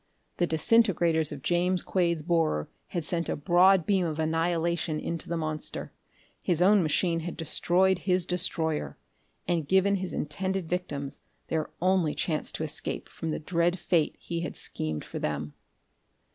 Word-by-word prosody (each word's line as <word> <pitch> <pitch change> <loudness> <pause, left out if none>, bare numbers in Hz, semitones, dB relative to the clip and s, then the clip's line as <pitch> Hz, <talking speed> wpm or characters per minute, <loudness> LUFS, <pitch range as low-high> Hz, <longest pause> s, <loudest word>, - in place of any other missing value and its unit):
The 175 - +2
disintegrators 170 -3 +3
of 135 - -7
James 180 +1 +1
Quade's 170 -4 +1
borer 160 - +1 0.2
had 170 -4 -3
sent 170 0 -1
a - - 0
broad 180 +3 +4
beam 190 -4 +2
of 155 -2 -3
annihilation 165 0 0
into 170 -1 -4
the 170 - -1
monster. 155 -2 -4 0.5
His 175 -3 0
own 195 +3 +6
machine 165 +1 +1
had 170 +1 -5
destroyed 180 +3 +2
his 180 -2 +1
destroyer 165 -3 -1 0.5
and 165 -4 0
given 190 +3 +3
his 185 -1 -4
intended 185 +4 -2
victims 145 -6 -3 0.3
their 160 -1 -1
only 185 -4 +2
chance 155 -3 -1
to - - -3
escape 155 +2 -2
from 165 - -5
the 155 - -1
dread 170 +2 +1
fate 170 -3 +1
he 170 -1 -4
had 170 - -5
schemed 80 -1 -3
for - - -6
them. 75 0 -3
170 Hz, 155 wpm, -28 LUFS, 155-180 Hz, 0.5 s, own